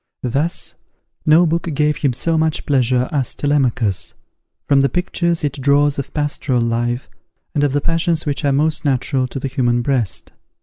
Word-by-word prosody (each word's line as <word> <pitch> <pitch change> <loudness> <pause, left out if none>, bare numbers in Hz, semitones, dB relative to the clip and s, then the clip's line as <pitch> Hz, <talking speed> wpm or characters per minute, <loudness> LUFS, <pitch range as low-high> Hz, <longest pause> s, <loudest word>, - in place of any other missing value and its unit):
Thus, 140 +7 -2 0.5
no 160 +3 +6
book 170 +1 -1
gave 150 +1 +1
him 140 - +1
so 165 +7 -1
much 160 -1 0
pleasure 125 -2 +2
as 140 -5 -1
Telemachus, 125 -9 0 0.5
from 140 -1 +4
the 140 - +2
pictures 170 -2 -1
it 140 -1 -2
draws 145 +1 +3
of 140 - -5
pastoral 145 -4 -1
life, 120 +2 -1 0.5
and 145 -3 +1
of 145 - +2
the 145 - +1
passions 165 +1 0
which 145 -1 -2
are 140 - +2
most 150 +3 +1
natural 130 -1 0
to 135 - -6
the 135 - -3
human 120 -2 0
breast. 125 -6 -1
140 Hz, 170 wpm, -19 LUFS, 130-155 Hz, 0.5 s, no